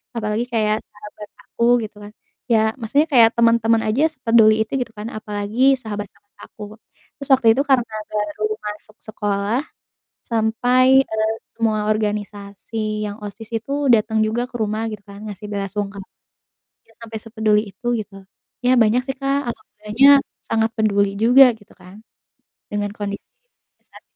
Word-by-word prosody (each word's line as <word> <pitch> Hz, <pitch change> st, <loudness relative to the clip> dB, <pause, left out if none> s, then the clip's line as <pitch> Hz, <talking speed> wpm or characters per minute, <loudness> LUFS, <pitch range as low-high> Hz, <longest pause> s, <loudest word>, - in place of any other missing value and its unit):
apalagi 215 Hz, +1 st, -1 dB
kayak 215 Hz, -1 st, +2 dB
sahabat 210 Hz, 0 st, -13 dB
aku 235 Hz, -, -5 dB, 0.2 s
gitu 210 Hz, 0 st, -8 dB
kan. 205 Hz, -, -10 dB, 0.4 s
Ya 225 Hz, -, +5 dB, 0.2 s
maksudnya 280 Hz, +8 st, +1 dB
kayak 230 Hz, -4 st, +7 dB
temen-temen 230 Hz, -1 st, +3 dB
aja 250 Hz, +8 st, +1 dB
sepeduli 225 Hz, -6 st, +4 dB
itu 220 Hz, -, -24 dB
gitu 245 Hz, -2 st, -4 dB
kan, 210 Hz, +2 st, -6 dB
apalagi 215 Hz, +5 st, +1 dB
sahabat-sahabat 205 Hz, -1 st, -8 dB, 0.2 s
aku 210 Hz, -, -10 dB, 0.6 s
terus 280 Hz, -, -7 dB
waktu 245 Hz, -, -1 dB
itu 270 Hz, -, +1 dB
karena 245 Hz, -4 st, +2 dB, 0.2 s
baru 210 Hz, 0 st, -3 dB, 0.2 s
masuk 210 Hz, +1 st, -8 dB
sekolah 210 Hz, +3 st, -2 dB, 0.6 s
sampai, 245 Hz, +4 st, +3 dB
eee, 220 Hz, -1 st, -1 dB, 0.2 s
semua 225 Hz, -2 st, 0 dB
organisasi 210 Hz, 0 st, -4 dB
yang 205 Hz, +1 st, -6 dB
OSIS 210 Hz, +2 st, -9 dB
itu 275 Hz, -, -7 dB, 0.2 s
datang 220 Hz, 0 st, +2 dB
juga 240 Hz, +3 st, -2 dB
ke 240 Hz, -, -8 dB
rumah 220 Hz, 0 st, -2 dB
gitu 210 Hz, -2 st, -8 dB
kan, 200 Hz, 0 st, -12 dB
ngasih 205 Hz, 0 st, -9 dB
bela 200 Hz, -1 st, -3 dB
sungkawa, 200 Hz, -1 st, -5 dB, 0.8 s
ya 225 Hz, -, -26 dB
sampai 225 Hz, -1 st, -8 dB
sepeduli 215 Hz, -1 st, 0 dB
itu 215 Hz, +6 st, -13 dB
gitu. 195 Hz, -3 st, -8 dB, 0.3 s
Ya 250 Hz, +1 st, +3 dB
banyak 230 Hz, +1 st, +4 dB
sih 270 Hz, -, -3 dB
Kak, 275 Hz, -1 st, -1 dB
agak 220 Hz, -2 st, -10 dB
banyak, 275 Hz, +7 st, +5 dB, 0.2 s
sangat 225 Hz, 0 st, 0 dB
peduli 200 Hz, -2 st, +1 dB
juga 245 Hz, +6 st, +7 dB
gitu 205 Hz, -, -21 dB
kan 190 Hz, +5 st, -15 dB, 0.6 s
dengan 205 Hz, -1 st, -3 dB
kondisi 205 Hz, -1 st, -6 dB, 0.6 s
saat -, -, -17 dB
215 Hz, 150 wpm, -20 LUFS, 210-230 Hz, 0.8 s, kayak